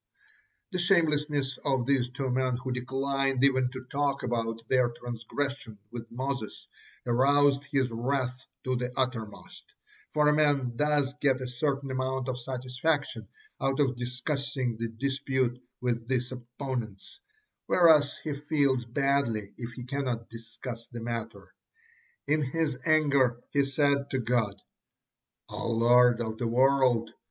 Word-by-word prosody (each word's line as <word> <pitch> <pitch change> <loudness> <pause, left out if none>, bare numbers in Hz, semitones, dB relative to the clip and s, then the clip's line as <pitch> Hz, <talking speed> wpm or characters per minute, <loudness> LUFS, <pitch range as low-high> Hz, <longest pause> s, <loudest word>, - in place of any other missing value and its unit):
The 185 - -2
shamelessness 150 -6 +2
of 135 -4 +1
these 130 -2 +2
two 130 +1 -3
men, 130 -1 +1
who 130 +1 -5
declined 135 +1 0
even 130 -2 +4
to 130 0 -7
talk 140 +1 -1
about 115 -1 -2
their 125 -2 +3
transgression 120 +1 -5
with 120 -1 -7
Moses, 130 -2 -4 0.4
aroused 140 +3 +4
his 135 -4 0
wrath 125 +2 -1 0.2
to 130 0 0
the 125 0 -2
uttermost, 125 -5 -3 0.5
for 150 -1 +2
a 150 - +5
man 145 -5 +2
does 145 0 +1
get 135 -3 +3
a 130 - -4
certain 135 +2 -1
amount 130 0 -1
of 125 -1 -3
satisfaction 130 +4 -2 0.3
out 135 +1 0
of 135 -3 +2
discussing 130 +1 -2
the 115 0 -2
dispute 130 0 -1 0.2
with 120 -2 -1
this 125 -1 -1
opponents, 120 - -6 0.5
whereas 155 -5 +5
he 155 - -2
feels 140 -3 +1
badly 120 -5 0
if 120 0 -6
he 125 - -7
cannot 125 -3 -3
discuss 115 +1 -8
the 120 - -8
matter. 115 -1 -5 0.7
In 150 +2 +2
his 150 +1 0
anger 140 -6 +3
he 140 - +3
said 140 0 +1
to 135 - -1
God: 115 -5 0 0.9
"O - - -4
Lord 120 +1 +5
of 110 -1 -4
the 120 - 0
world! 130 -1 +3
130 Hz, 135 wpm, -29 LUFS, 120-140 Hz, 0.9 s, a